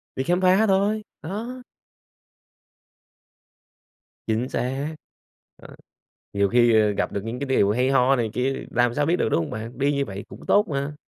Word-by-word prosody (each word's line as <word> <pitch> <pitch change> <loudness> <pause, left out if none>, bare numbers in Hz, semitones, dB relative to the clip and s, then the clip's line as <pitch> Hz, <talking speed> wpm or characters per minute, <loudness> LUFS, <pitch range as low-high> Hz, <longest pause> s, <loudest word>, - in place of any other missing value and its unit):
Đi 130 - -1
khám 175 +6 +1
phá 190 +4 +4
thôi, 200 +2 +1 0.2
đó. 230 +9 -6 2.6
Chính 115 +4 -1
xác! 135 +5 -3 0.6
Ờ, - - -14 0.6
nhiều 100 -1 +2
khi, 120 -1 +4
ờ, 105 -1 +2
gặp 100 - -2
được 100 - -4
những 115 +3 -5
cái 140 - -3
điều 105 -6 +3
hay 125 +4 +1
ho 135 0 +4
này 115 -3 -1
kia 130 +2 -2
làm 120 -1 +2
sao 145 +3 0
biết 165 +4 +2
được, 115 - 0
đúng - - +2
hông 80 - -5
bạn? 115 +2 -7
Đi 140 +2 +1
như 140 0 0
vậy 100 -2 -7
cũng - - -12
tốt 205 +1 +4
mà. 140 0 -2
135 Hz, 180 wpm, -24 LUFS, 115-165 Hz, 2.6 s, phá